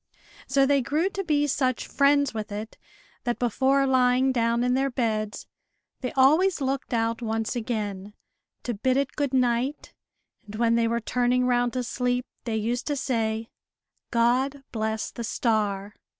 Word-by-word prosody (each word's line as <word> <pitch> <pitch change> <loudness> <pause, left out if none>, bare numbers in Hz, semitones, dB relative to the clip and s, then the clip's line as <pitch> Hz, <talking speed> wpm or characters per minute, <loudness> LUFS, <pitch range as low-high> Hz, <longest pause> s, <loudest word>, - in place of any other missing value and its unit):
So 275 -1 +3
they 280 0 +3
grew 305 +9 0
to 390 0 -3
be 295 -4 +2
such 255 -3 0
friends 280 -1 +2
with 215 -2 -5
it, 215 +2 -6 0.5
that, 240 -1 -1
before 265 +3 +2
lying 260 0 +3
down 235 -1 +1
in 250 0 +2
their 270 +1 +1
beds, 215 -4 -2 0.5
they 250 - -3
always 315 +8 +4
looked 270 0 -2
out 230 0 0
once 225 +1 -2
again, 210 -4 -4 0.5
to 240 - -2
bid 255 +5 +1
it 280 0 -1
good 285 -3 -1
night; 255 +2 0 0.5
and 205 - -8
when 230 +1 +2
they 230 0 +2
were 235 +1 -1
turning 250 +2 +1
round 245 -1 +1
to 255 -1 -1
sleep, 250 +1 -1 0.2
they 230 -2 -2
used 235 +3 -2
to 295 - 0
say, 225 -4 -2 0.6
"God 255 +4 +1
bless 220 -1 -2
the 235 - -6
star!" 210 -3 -1
245 Hz, 160 wpm, -26 LUFS, 225-270 Hz, 0.6 s, always